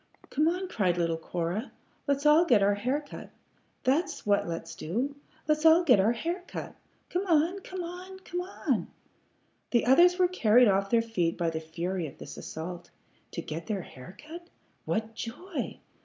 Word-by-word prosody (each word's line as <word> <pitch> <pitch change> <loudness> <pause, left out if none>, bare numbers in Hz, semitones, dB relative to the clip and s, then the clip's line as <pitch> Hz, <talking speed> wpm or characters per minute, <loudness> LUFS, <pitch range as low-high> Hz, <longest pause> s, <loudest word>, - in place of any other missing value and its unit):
"Come 305 +3 +2
on," 365 +3 0
cried 185 - +1
little 165 -1 +1
Cora. 175 +8 -3 0.4
"Let's 280 +1 0
all 300 +3 +7
get 210 - +4
our 200 +1 +4
hair 250 +8 -1
cut. 290 - -10 0.5
That's 325 +7 0
what 205 -3 +2
let's 165 -1 -5
do. 245 - -2 0.3
Let's 305 0 +2
all 325 +2 +7
get 250 - +6
our 210 +5 +4
hair 340 +9 -3
cut! - - -6 0.4
Come 370 +3 -1
on! 335 +3 +3
Come 370 -1 -6
on! 365 +2 -8
Come 355 -1 -4
on!" 365 +2 -2 0.8
The 235 -2 +2
others 345 +8 +6
were 365 -1 +4
carried 245 -9 +5
off 195 0 +2
their 230 0 +3
feet 180 -8 -1
by 170 -1 0
the 160 - -3
fury 170 +2 -3
of - - -12
this - - -9
assault. 175 +2 -7 0.4
To 170 - -4
get 160 +2 -6
their 200 -5 -2
hair 145 +10 -12
cut! 340 +3 -10 0.4
What 220 0 -2
joy! 250 - -5
240 Hz, 175 wpm, -29 LUFS, -, 0.8 s, all